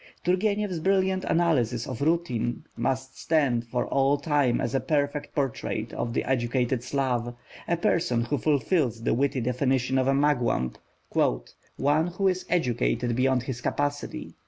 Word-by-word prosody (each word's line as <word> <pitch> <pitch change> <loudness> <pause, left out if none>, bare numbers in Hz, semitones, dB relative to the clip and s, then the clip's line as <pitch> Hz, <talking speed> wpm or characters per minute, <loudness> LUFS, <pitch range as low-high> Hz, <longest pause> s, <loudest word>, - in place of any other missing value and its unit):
Turgenev's 200 0 +1
brilliant 190 +1 +1
analysis 130 -9 +1
of 130 -1 -6
Rudin 130 -7 0
must 130 +2 -2
stand 130 -7 +1
for 120 +1 -1
all 140 +1 +2
time 145 -6 +1
as 120 - -2
a 135 - +2
perfect 145 +2 -1
portrait 125 -5 -2
of 120 - -2
the - - 0
educated 125 -1 0
Slav, 125 -3 -1 0.3
a 170 - +1
person 160 -8 +1
who 145 +2 -1
fulfils 140 - +1
the - - +2
witty 135 +2 +1
definition 130 +1 +1
of 130 - +1
a 135 - +4
Mugwump, 125 - +1 1.0
"one 150 +4 +2
who 185 +3 0
is 185 0 -1
educated 125 -6 +1
beyond 130 0 +2
his 120 -2 -5
capacity." 145 +2 -3
135 Hz, 145 wpm, -26 LUFS, 120-155 Hz, 1.0 s, a